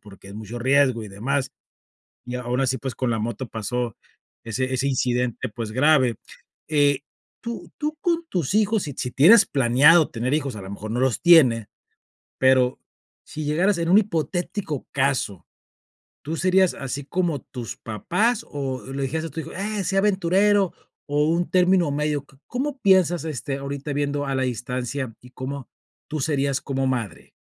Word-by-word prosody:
porque 100 -2 -15
es - - -10
mucho 110 +2 -7
riesgo 130 -2 +2
y - - -9
demás, 130 +7 -2 0.7
y 125 - -5
aún 125 +1 -2
así, 130 0 +1
pues, 130 -1 -5
con 130 - -2
la 115 - 0
moto 120 +3 -4
pasó 115 +1 -3 0.5
ese 130 +3 -2
ese 130 +2 0
incidente, 125 -3 0
pues, 110 0 -6
grave 130 -2 +3 0.5
eh, 145 -3 +3 0.4
tú 235 0 -6
tú 305 +1 -2
con 340 -1 0
tus 175 - -1
hijos, 215 -1 +2
si 145 - -5
si 125 - -3
tienes 205 +11 +7
planeado 145 +5 +5
tener 125 +4 -1
hijos, 140 -5 -1
a - - -7
lo 95 - -9
mejor 105 +2 -7
no 120 - -1
los 130 -3 +1
tiene, 130 -11 +6 0.7
pero 130 -1 +4 0.5
si 155 0 -6
llegaras 175 +6 +2
en 165 - -1
un 190 - +7
hipotético 175 - -2
caso, 135 -9 -1 0.8
¿tú 160 +3 -4
serías 185 +1 +3
así 135 +1 -5
como 170 -4 -1
tus 120 -3 -7
papás 205 - -1
o 135 -3 -4
le 135 0 -3
dijeras 160 +4 -2
a - - -9
tu 160 +2 -4
hijo: - - -9
"Eh, 205 +2 -3
sé 195 +2 -1
aventurero", 195 0 +3 0.3
o 145 0 +2
un 170 +1 0
término 180 -4 +3
medio? 150 -1 -1
¿Có 135 -1 -23
cómo 265 +2 -3
piensas, 180 -4 +3
este, 140 -2 -3
ahorita 140 +1 -5
viendo 145 0 -1
a 135 - -1
la 130 - 0
distancia, 125 0 -3
y 125 - -15
cómo 135 0 -6 0.4
tú 155 0 -3
serías 140 -2 0
como 135 -1 -1
madre? 120 -6 -3
140 Hz, 170 wpm, -23 LUFS, 125-170 Hz, 0.8 s, tienes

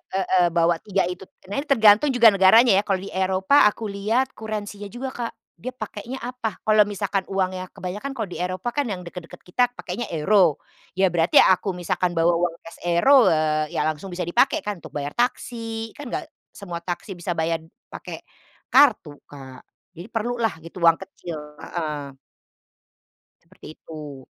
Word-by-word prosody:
heeh, 185 -2 +3
bawa 170 0 +2
dua 195 -2 +1
itu. 180 - -8 0.3
Nah, 240 - -1
ini 290 - -4
tergantung 225 0 +5
juga 235 -3 +7
negaranya 200 +5 +6
ya. 205 - -1
Kalau 195 -2 0
di 195 - -8
Eropa 190 +7 +3
aku 210 +1 -3
lihat 225 +6 0
currency-nya 210 -2 -6
juga 260 +2 -5
Kak. 235 -2 -5 0.3
Dia 255 - -4
pakainya 215 +4 -6
apa. 245 -3 -4
Kalau 215 0 +5
misalkan 200 -1 -1
uangnya, 185 -1 -2
kebanyakan 210 +10 -6
kalau 225 - -1
di 180 -2 -7
Eropa 185 +7 -3
kan 290 - +1
yang 180 -3 -5
dekat-dekat 170 -1 -9
kita 245 +7 +2
pakainya 210 +5 -5
euro 170 0 +3 0.4
ya 190 - +4
berarti 165 0 +3
aku 190 +2 +5
misalkan 175 0 -1
bawa 170 +1 +4
uang 170 0 0
kes 165 - -11
euro, 250 +9 +6
eee, 155 -1 0
ya - - +1
langsung 155 +5 -3
bisa 180 0 -4
dipakai 270 - +2
kan 205 -5 -4
untuk - - -10
bayar 145 0 -3
taksi, 225 -2 -3
kan 285 -4 -9
enggak - - -3 0.2
semua 175 -4 -8
taksi 180 +3 -5
bisa 175 -1 -4
bayar 160 0 0 0.3
pakai - - -8 0.5
kartu 225 - +4
Kak. 130 -2 -11 0.3
Jadi 175 +3 -10
perlulah 230 -2 -1
gitu 170 +1 -10
uang 165 -1 +6
kecil, 180 -4 -8 0.2
heeh. 150 -5 -5 1.3
Seperti 170 -2 -14
itu. 150 -4 -10
190 Hz, 165 wpm, -23 LUFS, 170-225 Hz, 1.3 s, juga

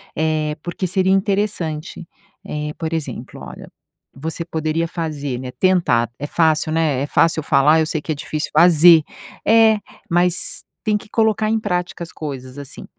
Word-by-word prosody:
Eh, 155 -1 0
porque 175 +2 -4
seria 190 +1 +1
interessante, 195 -5 -2 0.4
eh, 150 0 -4
por 160 0 -4
exemplo, 160 -3 -5
olha, - - -10 0.5
você 160 +4 -5
poderia 160 0 -2
fazer, 150 -7 -4
né, 130 0 -6
tentar. 170 - +2
É 145 - -4
fácil, 155 -1 +1
né, 155 -5 +1
é 140 - -2
fácil 165 +1 +2
falar, 150 +3 +4
eu 160 - +2
sei 155 - -2
que 155 - -5
é - - -1
difícil 150 +1 -4
fazer. 170 -1 +7 0.5
É, 220 -1 +5 0.3
mas 175 +1 +1 0.2
tem 210 -1 +1
que - - -15
colocar 220 -1 +1
em 225 - +1
prática 180 -3 -3
as 165 - -9
coisas, 130 -3 -7
assim. 140 -2 -9
160 Hz, 160 wpm, -20 LUFS, 150-180 Hz, 0.5 s, fazer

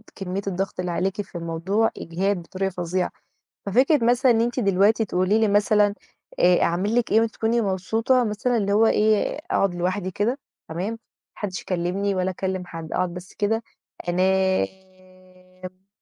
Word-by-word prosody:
كمِّية 190 0 -4
الضغط 195 0 -3
اللي 180 -1 -2
عليكِ 190 +4 -1
في 190 -3 -9
الموضوع، 170 +7 0
إجهاد 190 +4 -1
بطريقة 190 +3 -3
فظيعة. 180 +1 -2 0.5
ففكرة 255 - +3
مثلًا 245 +2 +4
إن 225 - +3
أنتِ 240 +2 -1
دلوقتي 205 +2 +3
تقولي 185 +3 +1
لي 220 - +3
مثلًا، 205 0 +3 0.5
آآ، 175 0 +5
"أعمل 190 +7 0
لِك 245 - +1
إيه 220 - +5
وتكوني 225 +1 0
مبسوطة؟" 225 +6 +1
مثلًا 230 +3 0
اللي 200 -1 0
هو 220 +2 +5
إيه، 215 0 +4 0.2
آآ - - -8
أقعد 195 - +1
لوحدي 185 +2 -2
كده، 230 +9 -1 0.3
تمام؟ 175 +6 -3
ما 230 - -6 0.4
حدِّش 190 -4 -4
يكلِّمني 190 +3 -1
ولا 185 0 0
أكلِّم 185 0 -3
حد، 165 -2 -7
أقعد 180 -1 0
بس 180 +1 -10
كده. 225 +2 0 0.5
أنام. 185 0 -3
195 Hz, 155 wpm, -24 LUFS, 185-220 Hz, 0.5 s, آآ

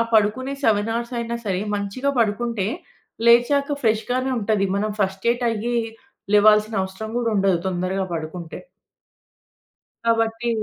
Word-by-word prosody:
పడుకునే 225 +6 +2
7 215 0 +2
హౌర్స్ 235 +2 -3
అయినా 235 0 -3
సరే, 190 -2 0 0.2
మంచిగా 205 +8 -2
పడుకుంటే, 220 -1 0 0.6
లేచాక 280 +5 +4
ఫ్రెష్‌గానే 245 +4 +1
ఉంటది. 210 -2 +1
మనం 210 +1 -1
ఫస్ట్రేట్ 205 +6 0
అయ్యి 230 +2 -2 0.6
లేవాల్సిన 210 +1 +5
అవసరం 190 +3 -6
గూడా 230 -2 0
ఉండదు, 195 -3 +3
తొందరగా 185 +1 -1
పడుకుంటే. 165 +1 -6 1.5
కాబట్టి 225 +1 +1
220 Hz, 115 wpm, -22 LUFS, 195-235 Hz, 1.5 s, లేవాల్సిన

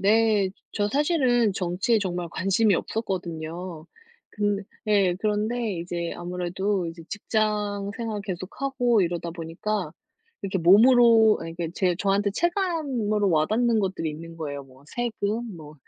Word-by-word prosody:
네, 210 -1 +3 0.2
저 205 -1 0
사실은 255 - +2
정치에 185 +5 +1
정말 180 -3 -3
관심이 195 +4 +2
없었거든요. 175 -5 -4 0.4
그 205 -1 -1 0.2
예, 200 -4 +3
그런데 215 +1 0
이제 170 0 -4
아무래도 180 +2 -2
이제 165 0 -8
직장 205 -1 -1
생활 225 -4 -3
계속하고 230 +5 0
이러다 170 0 -2
보니까 170 +2 -3 0.5
이렇게 195 -1 -2
몸으로 225 +4 +6
이렇게 165 0 -4
제 180 -2 +1
저한테 200 +1 +1
체감으로 285 - 0
와 155 -2 +3
닿는 230 +2 +2
것들이 190 -4 -2
있는 165 +2 -9
거예요. 145 -3 -5
뭐 135 +1 -19
세금, 225 -2 -3
뭐 155 -2 -11
200 Hz, 290 characters per minute, -25 LUFS, 175-220 Hz, 0.5 s, 몸으로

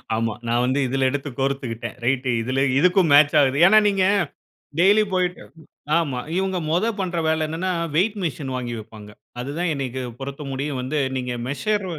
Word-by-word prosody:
ஆமா. 115 -1 -1
நான் 120 +1 +1
வந்து 130 +3 +1
இதில 135 +1 +1
எடுத்து 145 +1 -3
கோரத்துக்கிட்டேன். 135 -4 -3
ரைட் 130 0 0
இதில, 130 +3 -1 0.2
இதுக்கும் 180 -2 +3
மேட்ச் 145 0 +6
ஆகுது. 135 0 +2
ஏன்ன, 215 +2 +6
நீங்க 195 -2 +1 0.7
டெய்லி 205 +4 +5
போய்ட்டு 180 -1 -1 0.5
ஆமா. 145 -7 -1 0.2
இவங்க 190 -1 0
முதல் 215 +6 0
பண்ணுற 180 -3 -1
வேல 160 0 +1
என்னன்னா, 170 +4 -2 0.2
வெய்ட் 205 +5 +2
மிஷின் 145 -5 -3
வாங்கி 120 -2 -4
வைப்பாங்க. 105 -1 -12 0.3
அது 135 +3 -5
தான் 175 -2 0
எனக்கு 130 -2 -4 0.2
பொறுத்த 140 +2 -6
முடியும் 135 0 -3
வந்து 135 +4 -3 0.2
நீங்க 125 -1 -3
மெஷர் 195 +9 -1
145 Hz, 165 wpm, -22 LUFS, 130-180 Hz, 0.7 s, மேட்ச்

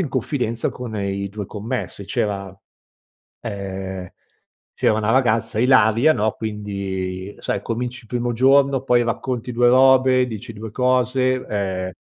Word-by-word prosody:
in 165 - -1
confidenza 125 -3 -1
con 120 -3 -7
i 100 0 -2
2 100 0 -6
commessi. 110 -1 -5
C'era 100 -4 -3 0.9
ehm, 95 -4 -5 0.6
c'era - - +2
una 110 +1 0
ragazza, 115 -3 +2
Ilaria 125 +3 +5
no, 110 -3 +1
quindi 100 -3 -4
sai 100 - -2
cominci 125 +3 -4
il 115 - -20
primo 120 0 -2
giorno 135 +2 +4
poi 125 -2 +3
racconti 120 +1 -3
2 120 +1 +3
robe, 130 0 +5
dici 115 0 -7
2 110 0 -8
cose, 130 +1 +2
ehm 95 -3 -2
115 Hz, 135 wpm, -21 LUFS, 100-125 Hz, 0.9 s, Ilaria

